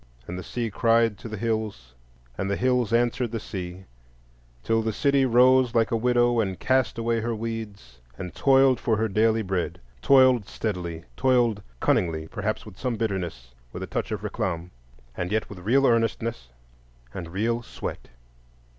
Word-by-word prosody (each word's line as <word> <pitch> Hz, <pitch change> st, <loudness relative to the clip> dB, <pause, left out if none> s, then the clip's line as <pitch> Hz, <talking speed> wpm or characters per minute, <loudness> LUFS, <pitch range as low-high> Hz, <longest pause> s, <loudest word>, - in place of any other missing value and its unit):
And 90 Hz, -, -5 dB
the 90 Hz, -, -5 dB
sea 115 Hz, +1 st, -3 dB
cried 115 Hz, -1 st, +2 dB
to 115 Hz, -, -8 dB
the 110 Hz, -, -5 dB
hills 110 Hz, -, -3 dB, 0.4 s
and 95 Hz, +6 st, -3 dB
the 100 Hz, -, +1 dB
hills 125 Hz, -3 st, +1 dB
answered 120 Hz, 0 st, +1 dB
the 115 Hz, -, -2 dB
sea, 95 Hz, -2 st, -7 dB, 0.8 s
till 115 Hz, 0 st, +2 dB
the 110 Hz, 0 st, -1 dB
city 140 Hz, +1 st, +2 dB
rose 125 Hz, 0 st, +5 dB
like 115 Hz, -1 st, +3 dB
a -, -, +2 dB
widow 120 Hz, 0 st, +2 dB
and 95 Hz, -4 st, -1 dB
cast 130 Hz, -3 st, +1 dB
away 115 Hz, 0 st, 0 dB
her 115 Hz, +1 st, -2 dB
weeds, 105 Hz, -, -6 dB, 0.2 s
and 90 Hz, -2 st, -6 dB
toiled 135 Hz, -2 st, +4 dB
for 110 Hz, -2 st, +1 dB
her 110 Hz, +1 st, +1 dB
daily 110 Hz, +2 st, +2 dB
bread; 95 Hz, -3 st, -2 dB, 0.2 s
toiled 130 Hz, -, +5 dB
steadily, 85 Hz, -6 st, -4 dB
toiled 120 Hz, -5 st, +2 dB, 0.2 s
cunningly,—perhaps 85 Hz, +6 st, -1 dB
with 105 Hz, -3 st, -12 dB
some 125 Hz, -2 st, -1 dB
bitterness, 90 Hz, -, -3 dB, 0.2 s
with -, -, -6 dB
a -, -, -2 dB
touch, -, -, -3 dB
of -, -, -3 dB
réclame,—and 65 Hz, -3 st, -5 dB
yet 110 Hz, 0 st, 0 dB
with 100 Hz, -, -8 dB
real 125 Hz, +9 st, +3 dB
earnestness, 115 Hz, -, 0 dB, 0.7 s
and 85 Hz, -3 st, -6 dB
real 115 Hz, +6 st, -1 dB
sweat. -, -, -7 dB
110 Hz, 160 wpm, -25 LUFS, 95-120 Hz, 0.8 s, rose